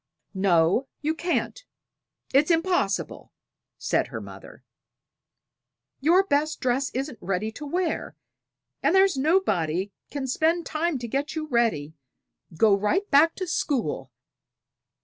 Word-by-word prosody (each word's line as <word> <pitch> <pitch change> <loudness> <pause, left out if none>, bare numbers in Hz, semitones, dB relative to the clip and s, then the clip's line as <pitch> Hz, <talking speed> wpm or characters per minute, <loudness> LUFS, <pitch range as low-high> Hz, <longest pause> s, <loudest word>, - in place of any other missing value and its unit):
"No, 190 +5 +2
you 305 +2 0
can't; 350 +9 -2 0.7
it's 285 +4 +4
impossible," 335 - 0 0.5
said - - 0
her - - -6
mother. - - -12 1.4
"Your 340 +7 +4
best 310 -3 0
dress 255 +2 0
isn't 265 -3 -4
ready 195 +4 -2
to 290 +6 -8
wear, 350 +2 -2 0.7
and - - +2
there's 385 -3 +5
nobody 205 - +1 0.2
can 280 -2 -4
spend 325 +6 +1
time 320 -1 -1
to 240 -1 -6
get 275 +7 -2
you 315 -1 -3
ready. 230 - 0 0.6
Go 215 +1 +5
right 210 - 0
back 305 +4 +5
to 370 - -4
school." 240 - -2
280 Hz, 120 wpm, -25 LUFS, 215-330 Hz, 1.4 s, there's